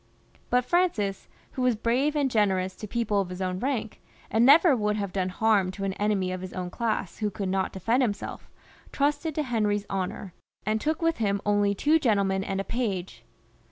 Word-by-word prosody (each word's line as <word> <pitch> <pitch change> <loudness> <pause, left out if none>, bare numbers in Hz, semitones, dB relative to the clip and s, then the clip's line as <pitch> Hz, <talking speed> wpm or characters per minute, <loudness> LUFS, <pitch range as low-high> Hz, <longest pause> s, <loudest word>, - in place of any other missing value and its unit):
But 250 0 +2
Francis, 250 - 0 0.2
who 260 - -5
was 250 -2 +3
brave 250 +7 +1
and 280 -3 +1
generous 190 -4 +1
to 215 - -7
people 210 -2 0
of 185 - -5
his 180 0 -7
own 185 -1 -2
rank, 245 -4 -3 0.3
and 225 +2 +3
never 295 +3 +7
would 210 -2 0
have 200 -3 -3
done 185 -1 0
harm 200 -1 +2
to 195 - -6
an 195 -1 -1
enemy 200 -2 0
of 185 0 -4
his 185 -1 -7
own 180 -1 -4
class 220 -5 -2
who 210 -1 0
could 195 -1 -4
not 190 0 0
defend 225 +7 +1
himself, 215 -5 -3 0.4
trusted 290 +2 0
to 305 - 0
Henry's 210 -5 0
honour, 190 -1 -3 0.3
and 215 0 0
took 315 +2 -1
with 330 0 +2
him 200 -3 0
only 205 -1 +2
two 305 +9 +3
gentlemen 200 -7 +1
and 195 0 -3
a - - -1
page. 195 -6 -3
210 Hz, 195 wpm, -27 LUFS, 195-250 Hz, 0.4 s, never